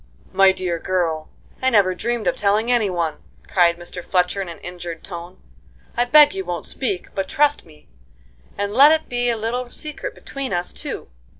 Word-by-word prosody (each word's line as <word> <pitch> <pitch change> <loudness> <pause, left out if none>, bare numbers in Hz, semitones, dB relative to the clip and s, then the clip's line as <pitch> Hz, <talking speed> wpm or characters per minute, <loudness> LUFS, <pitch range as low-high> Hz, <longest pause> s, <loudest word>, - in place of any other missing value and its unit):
"My 195 0 +6
dear 180 -3 -3
girl, 165 -4 -1 0.3
I 260 - +3
never 200 -6 +4
dreamed 235 +4 -2
of - - +2
telling 210 +4 +1
any 230 -5 +3
one!" 170 -4 -1 0.3
cried 170 -2 +3
Mr. 175 +1 -8
Fletcher 180 +1 +1
in 185 - -5
an 170 - -8
injured 175 -2 -7
tone. 175 0 -9 0.6
"I 240 - +2
beg 295 +6 +7
you 385 0 -3
won't - - -4
speak, 390 -3 -3
but 195 -1 -3
trust 295 - +2
me, 150 -2 -19 0.7
and 205 0 -2
let 285 +5 +8
it 315 0 +1
be 245 0 0
a 235 - 0
little 240 +3 -3
secret 305 - -6
between 275 -4 -5
us 175 0 -2
two. - - -7
200 Hz, 185 wpm, -21 LUFS, 175-245 Hz, 0.7 s, let